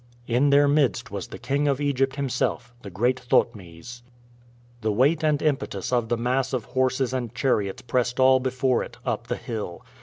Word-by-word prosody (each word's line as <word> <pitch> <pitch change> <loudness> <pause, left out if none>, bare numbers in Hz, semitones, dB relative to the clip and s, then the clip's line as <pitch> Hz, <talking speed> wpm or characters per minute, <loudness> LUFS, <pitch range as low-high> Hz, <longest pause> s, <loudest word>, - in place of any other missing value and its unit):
In 125 +5 +2
their 145 +1 +5
midst 140 -7 +1
was - - -5
the - - -9
King 145 +2 -1
of 140 -1 +1
Egypt 135 -2 0
himself, 125 -3 -2
the 100 - -8
great 120 +8 +1
Thotmes. 115 -2 -1 0.8
The 110 0 0
weight 140 +9 +2
and 150 -2 +2
impetus 135 -8 -1
of 120 -2 +1
the 120 - +1
mass 125 +3 0
of 125 -4 -2
horses 130 -1 0
and 120 -3 -3
chariots 105 -7 0
pressed 125 0 -1
all 130 0 +6
before 130 -1 0
it - - -8
up - - -2
the - - -2
hill. 105 -7 -6
125 Hz, 180 wpm, -25 LUFS, 120-135 Hz, 0.8 s, all